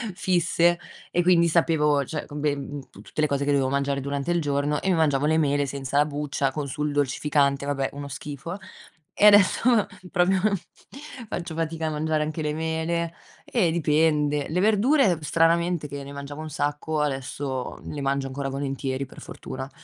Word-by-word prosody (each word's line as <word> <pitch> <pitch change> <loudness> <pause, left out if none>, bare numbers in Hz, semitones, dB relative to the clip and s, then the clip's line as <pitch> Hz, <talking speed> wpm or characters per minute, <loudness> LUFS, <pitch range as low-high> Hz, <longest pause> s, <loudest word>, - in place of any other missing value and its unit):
fisse, 175 -1 +2 0.3
e 175 - +2
quindi 170 -1 +4
sapevo, 150 -4 +2
cioè 150 +3 -4
co 145 - -11
beh 150 -1 0 0.3
tu - - -14
tutte - - -10
le 155 - +4
cose 140 -1 -1
che 145 - +1
dovevo 140 -2 +2
mangiare 140 0 0
durante 140 +3 -2
il 175 - +2
giorno 145 -1 0
e - - -3
mi 185 - +3
mangiavo 145 -4 +2
le 160 +1 +3
mele 145 -2 +2
senza 140 0 -3
la 145 - +5
buccia 145 -2 -2
con 150 -1 -3
sul 150 +2 -2
dolcificante. 140 0 +1
Vabbè, 135 -1 -1
uno 140 0 -6
schifo, 145 +5 -6 0.6
e - - +3
adesso 210 +2 +6 0.3
proprio 185 +1 +3 0.9
faccio 175 -4 -5
fatica 165 0 -2
a - - 0
mangiare 155 0 0
anche 155 +1 -4
le 150 -1 -1
mele, 160 +1 -2 0.3
eh, 205 -9 +1
dipende. 150 -2 +2
Le 170 +3 0
verdure, 215 - +4
stranamente, 165 +1 +2
che 140 +1 -6
ne 140 +1 -9
mangiavo 140 +1 -7
un 155 - -6
sacco, 145 +1 -2
adesso 135 -2 -3
le 150 - -6
mangio 135 0 0
ancora 135 +1 -4
volentieri, 135 -1 -3
per 130 - -14
fortuna. 130 0 -7
150 Hz, 175 wpm, -25 LUFS, 140-165 Hz, 0.9 s, adesso